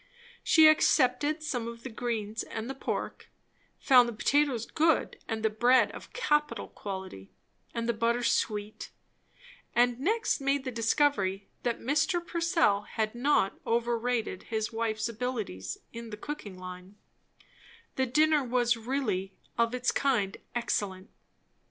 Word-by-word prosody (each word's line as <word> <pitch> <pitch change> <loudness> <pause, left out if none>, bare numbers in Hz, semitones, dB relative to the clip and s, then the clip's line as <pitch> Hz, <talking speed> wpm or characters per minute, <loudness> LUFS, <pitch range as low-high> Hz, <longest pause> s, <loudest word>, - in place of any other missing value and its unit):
She 320 -2 +7
accepted 300 0 +3
some 245 -7 -2
of 235 0 -8
the 260 - -5
greens 225 -2 -3
and 220 +1 -5
the 270 - -3
pork; 270 - -4 0.5
found 250 -3 +5
the - - -5
potatoes 270 0 +1
good, 320 0 +1
and 225 -1 -3
the 220 - +3
bread 245 +4 +4
of - - -11
capital 295 - 0
quality, 190 - -7 0.4
and 230 -1 -3
the 235 - +2
butter 235 +2 0
sweet; 210 -2 -1 0.9
and 245 0 +3
next 425 - 0
made 275 0 +1
the 260 - -4
discovery 225 -5 +1
that 240 -1 -1
Mr. 295 +7 +1
Purcell 335 - +2
had 215 +1 -3
not 245 -5 +1
overrated 235 -3 -1
his 220 0 -2
wife's 225 -1 -1
abilities 225 - -4 0.2
in 230 0 -7
the 210 - -7
cooking 210 -7 -7
line; 185 +1 -9 1.0
the 260 0 +1
dinner 305 +3 +3
was 240 -1 +2
really, 220 -6 -2 0.2
of 235 +1 +1
its 250 0 +1
kind, 230 -9 0 0.2
excellent. 205 -5 -2
235 Hz, 135 wpm, -29 LUFS, 215-270 Hz, 1.0 s, She